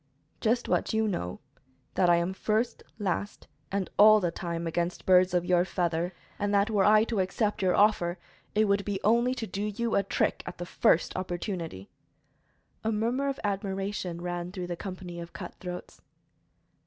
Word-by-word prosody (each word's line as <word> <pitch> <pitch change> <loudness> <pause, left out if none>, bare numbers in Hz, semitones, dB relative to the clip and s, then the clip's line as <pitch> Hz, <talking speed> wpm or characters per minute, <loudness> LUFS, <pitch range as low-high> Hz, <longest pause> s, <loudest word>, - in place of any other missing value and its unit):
"Just 235 +2 +1
what - - 0
you 220 0 +2
know 90 - -3 0.5
that 180 - +3
I 175 - +7
am 170 +2 0
first, 215 +4 -1 0.2
last 200 -1 -3 0.2
and 195 -1 -1
all 215 +1 +9
the 175 -4 0
time 170 -1 -4
against 170 +2 -2
birds 185 0 +5
of 175 -1 +1
your 175 -1 +4
feather, 175 -1 -1 0.3
and 205 0 0
that 200 +2 +3
were 205 -3 +3
I 215 +1 +6
to 225 -2 -2
accept 205 +3 0
your 185 -1 +3
offer 190 -4 +3 0.4
it 215 +1 +4
would 200 0 +2
be 200 -1 -2
only 235 +4 +3
to 230 - -3
do 195 0 -5
you 210 +2 -2
a - - +4
trick 195 - 0
at - - -6
the 175 - -5
first 175 -1 +2
opportunity." 175 - -4 0.9
A 220 - +1
murmur 235 +6 0
of 275 - -3
admiration 195 -3 -2
ran 175 0 -4
through 180 -2 -5
the 175 0 -4
company 180 -2 -7
of 170 0 -8
cutthroats. 180 -1 -8
190 Hz, 175 wpm, -28 LUFS, 175-210 Hz, 0.9 s, all